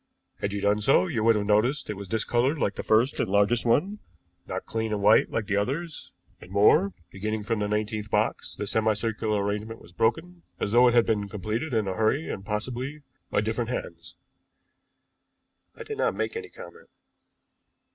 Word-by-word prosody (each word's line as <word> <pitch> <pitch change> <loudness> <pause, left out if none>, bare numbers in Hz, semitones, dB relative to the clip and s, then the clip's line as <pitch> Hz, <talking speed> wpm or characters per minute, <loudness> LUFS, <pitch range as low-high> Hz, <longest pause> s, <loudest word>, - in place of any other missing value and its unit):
"Had 100 - -2
you 100 0 -3
done 105 +1 +2
so 135 - +4
you 130 -12 -2
would 115 0 +5
have 105 -1 -1
noticed 110 +8 +2
that - - -5
it - - -4
was 100 0 -8
discolored 120 - +1
like 105 -7 0
the - - -5
first 115 +5 +2
and - - 0
largest 105 +5 +2
one, 190 - +2 0.5
not 95 - -4
clean 110 -1 -3
and 105 -1 -2
white 105 +2 +5
like 115 - -2
the 100 - -1
others 150 +10 -3 0.3
and - - -13
more, 110 - +4 0.2
beginning 105 +2 -3
from 115 +1 -1
the 105 - 0
nineteenth 105 0 -2
box - - -1
the 105 - -4
semi 110 +2 +2
circular 105 -1 -1
arrangement 105 +2 -3
was - - -16
broken, 160 - -1 0.2
as 100 - -2
though 120 +2 +6
it 120 - +3
had 120 - +5
been 105 -2 -1
completed 110 - -3
in 110 -4 0
a 95 - -1
hurry, 110 +10 +1
and 95 - -6
possibly 125 +7 -4 0.3
by - - +1
different - - -2
hands." - - -6 1.6
I - - -8
did 435 0 -7
not - - +1
make - - -2
any 455 -2 -5
comment. 460 +2 -13
110 Hz, 195 wpm, -26 LUFS, 105-130 Hz, 1.6 s, though